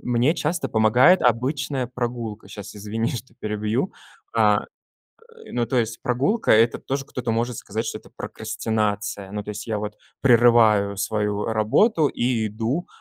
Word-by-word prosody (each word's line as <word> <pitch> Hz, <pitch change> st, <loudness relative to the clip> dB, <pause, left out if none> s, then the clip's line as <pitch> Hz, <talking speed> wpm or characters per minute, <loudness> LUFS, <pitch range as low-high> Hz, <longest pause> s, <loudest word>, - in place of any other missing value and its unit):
Мне 125 Hz, +4 st, +2 dB
часто 160 Hz, +1 st, -1 dB
помогает 120 Hz, +11 st, +5 dB
обычная 130 Hz, +2 st, 0 dB
прогулка. 120 Hz, -3 st, -4 dB
Щас 105 Hz, +1 st, -9 dB
извини, 110 Hz, +3 st, -2 dB
что 120 Hz, -1 st, -7 dB
перебью, 105 Hz, -, -1 dB, 0.4 s
а -, -, +4 dB, 0.7 s
Э, 460 Hz, -1 st, -15 dB
ну 120 Hz, -1 st, 0 dB
то 125 Hz, +3 st, -1 dB
есть, 115 Hz, -1 st, -1 dB
прогулка- 140 Hz, -, +1 dB
это 115 Hz, +2 st, +4 dB
тоже 135 Hz, 0 st, -3 dB
кто-то 125 Hz, -3 st, -3 dB
может 115 Hz, +1 st, -1 dB
сказать, 110 Hz, +4 st, -4 dB
что -, -, -3 dB
это -, -, -17 dB
прокрастинация. 105 Hz, -3 st, -3 dB
Ну, 105 Hz, 0 st, -4 dB
то -, -, -9 dB
есть, 105 Hz, +2 st, -6 dB
я 110 Hz, -, -1 dB
вот 105 Hz, 0 st, -5 dB, 0.2 s
прерываю 115 Hz, -5 st, +5 dB
свою 105 Hz, 0 st, -1 dB
работу 130 Hz, -, +3 dB
и 120 Hz, -4 st, 0 dB
иду, 115 Hz, -, -2 dB
115 Hz, 150 wpm, -23 LUFS, 105-125 Hz, 0.7 s, помогает